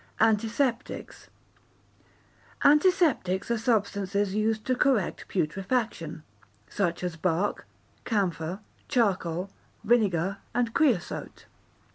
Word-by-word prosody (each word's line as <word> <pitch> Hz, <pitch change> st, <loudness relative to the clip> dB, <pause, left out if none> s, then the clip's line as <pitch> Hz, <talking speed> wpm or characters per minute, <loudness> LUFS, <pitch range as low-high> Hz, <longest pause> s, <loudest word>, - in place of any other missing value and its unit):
Antiseptics 225 Hz, +3 st, 0 dB, 1.3 s
Antiseptics 295 Hz, -, +3 dB
are 235 Hz, -, +2 dB
substances 200 Hz, -3 st, 0 dB
used 215 Hz, +1 st, 0 dB
to 255 Hz, -, +1 dB
correct 250 Hz, -8 st, +1 dB
putrefaction, 185 Hz, -2 st, -2 dB, 0.4 s
such 175 Hz, -4 st, -1 dB
as 175 Hz, -2 st, -2 dB
bark, 175 Hz, +4 st, -1 dB, 0.4 s
camphor, 185 Hz, -3 st, -1 dB, 0.3 s
charcoal, 190 Hz, -, 0 dB, 0.3 s
vinegar, 200 Hz, -5 st, +2 dB, 0.2 s
and 235 Hz, -2 st, +1 dB
creosote. 240 Hz, -, 0 dB
205 Hz, 80 wpm, -27 LUFS, 185-235 Hz, 1.3 s, Antiseptics